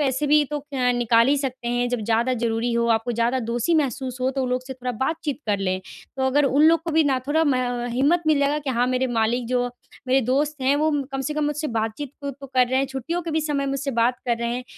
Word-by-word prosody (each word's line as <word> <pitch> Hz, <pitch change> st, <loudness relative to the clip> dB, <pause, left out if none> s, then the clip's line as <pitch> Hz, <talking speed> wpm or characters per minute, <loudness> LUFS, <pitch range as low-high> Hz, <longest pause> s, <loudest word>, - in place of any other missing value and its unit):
ऐसे 275 Hz, 0 st, 0 dB
भी 300 Hz, +1 st, +4 dB
तो 295 Hz, -, -1 dB, 0.2 s
क 250 Hz, -1 st, +2 dB
निकाल 230 Hz, 0 st, +4 dB
ही 285 Hz, -, +3 dB
सकते 260 Hz, -3 st, -3 dB
हैं। 245 Hz, 0 st, 0 dB
जब 245 Hz, -1 st, -2 dB
ज़्यादा 230 Hz, +3 st, +1 dB
ज़रूरी 235 Hz, 0 st, -1 dB
हो, 235 Hz, 0 st, +1 dB
आपको 225 Hz, +1 st, +1 dB
ज़्यादा 235 Hz, +3 st, +1 dB
दोषी 240 Hz, +8 st, +1 dB
महसूस 265 Hz, -4 st, -1 dB
हो, 255 Hz, -, +1 dB
तो 270 Hz, 0 st, -3 dB
वो 260 Hz, -, 0 dB
लोग 250 Hz, 0 st, -1 dB
से 265 Hz, -, -5 dB
थोड़ा 250 Hz, 0 st, -4 dB
बातचीत 290 Hz, +4 st, -2 dB
कर 205 Hz, -1 st, +1 dB
लें। 185 Hz, -1 st, -1 dB, 0.4 s
तो 265 Hz, 0 st, 0 dB
अगर 285 Hz, +3 st, +3 dB
उन 275 Hz, +2 st, +3 dB
लोग 330 Hz, 0 st, +3 dB
को 335 Hz, -, -3 dB
भी 320 Hz, 0 st, +4 dB
ना 270 Hz, -3 st, +2 dB
थोड़ा 315 Hz, +3 st, +2 dB
म 285 Hz, -4 st, +2 dB, 0.4 s
हिम्मत 290 Hz, +8 st, +2 dB
मिलेगा 290 Hz, -1 st, +2 dB
कि 285 Hz, -2 st, -4 dB
हाँ, 245 Hz, 0 st, +1 dB
मेरे 255 Hz, +1 st, +1 dB
मालिक 235 Hz, 0 st, 0 dB
जो 245 Hz, 0 st, +1 dB, 0.4 s
मेरे 265 Hz, +1 st, +4 dB
दोस्त 290 Hz, +2 st, 0 dB
हैं, 270 Hz, +2 st, +2 dB
वो 310 Hz, +2 st, +2 dB
म 290 Hz, -2 st, 0 dB
कम 270 Hz, -, -2 dB
से 300 Hz, +3 st, -3 dB
कम 305 Hz, -, 0 dB
मुझसे 295 Hz, +1 st, -2 dB
बातचीत 225 Hz, +5 st, -3 dB
खुद 280 Hz, -2 st, -3 dB
तो 275 Hz, -, -8 dB
कर 250 Hz, -1 st, +5 dB
रहे 260 Hz, +1 st, +1 dB
हैं। 270 Hz, -, +1 dB
छुट्टियों 270 Hz, +7 st, -4 dB
के 335 Hz, -, -4 dB
भी 315 Hz, 0 st, +1 dB
समय 290 Hz, -2 st, -1 dB
मुझसे 275 Hz, +1 st, -2 dB
बात 245 Hz, +2 st, +2 dB
कर 235 Hz, -1 st, +1 dB
रहे 235 Hz, 0 st, -2 dB
हैं, 250 Hz, 0 st, -5 dB
260 Hz, 265 wpm, -23 LUFS, 245-290 Hz, 0.4 s, कर